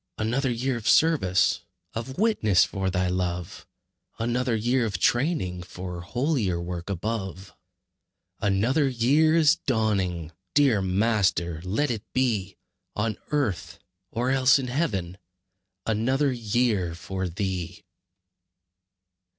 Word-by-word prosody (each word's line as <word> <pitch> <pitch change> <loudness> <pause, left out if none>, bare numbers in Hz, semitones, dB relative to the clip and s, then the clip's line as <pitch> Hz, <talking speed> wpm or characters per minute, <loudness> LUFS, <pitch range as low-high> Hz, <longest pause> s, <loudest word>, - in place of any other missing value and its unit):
Another 120 +5 0
year 125 +1 -1
of 115 - -2
service, 145 - +3 0.3
Of 120 +4 -5
witness 190 - +3
for 95 -2 -2
Thy 90 0 0
love; 90 -1 -3 0.5
Another 120 +1 0
year 120 +3 +1
of 105 -4 -2
training 120 - +1
For 90 0 -7
holier 115 - -1
work 85 +1 -5
above. 95 -1 -4 0.9
Another 115 +9 +2
year 140 +7 +3
is 160 -1 +5
dawning! 95 - -1 0.2
Dear 135 -8 +4
Master, 95 -4 +1
let 110 +10 0
it 110 -3 -3
be 110 -7 0 0.4
On 110 0 -1
earth, 140 - -1 0.3
or 120 +5 -1
else 135 +1 +5
in 130 -2 -3
heaven, 100 - -2 0.7
Another 130 +6 +1
year 110 -7 0
for 95 +1 -4
Thee! 90 -1 -4
110 Hz, 110 wpm, -26 LUFS, 95-130 Hz, 0.9 s, is